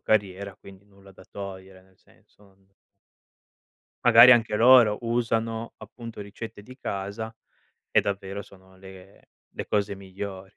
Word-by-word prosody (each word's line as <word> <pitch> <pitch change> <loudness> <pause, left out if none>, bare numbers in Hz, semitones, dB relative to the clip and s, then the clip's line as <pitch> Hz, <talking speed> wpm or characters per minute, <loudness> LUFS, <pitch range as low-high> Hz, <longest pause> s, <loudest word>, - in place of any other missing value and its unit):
carriera, 100 -2 -1
quindi 100 -1 -16
nulla 100 -1 -19
da 95 - -17
togliere, 95 -1 -10
nel 95 0 -28
senso, - - -27
non 95 -1 -26 1.4
magari 120 0 +9
anche 115 -3 +2
loro 115 -2 +6
usano, 115 -1 -2
appunto, 115 -3 -10
ricette 105 +1 -9
di 130 +5 -14
casa 105 0 -5 0.6
e - - +4
davvero 100 0 -4
sono 95 -1 -19
le 95 0 -15 0.3
le - - -4
cose 100 -1 -1
migliori. 95 0 -8
100 Hz, 130 wpm, -25 LUFS, 95-115 Hz, 1.4 s, magari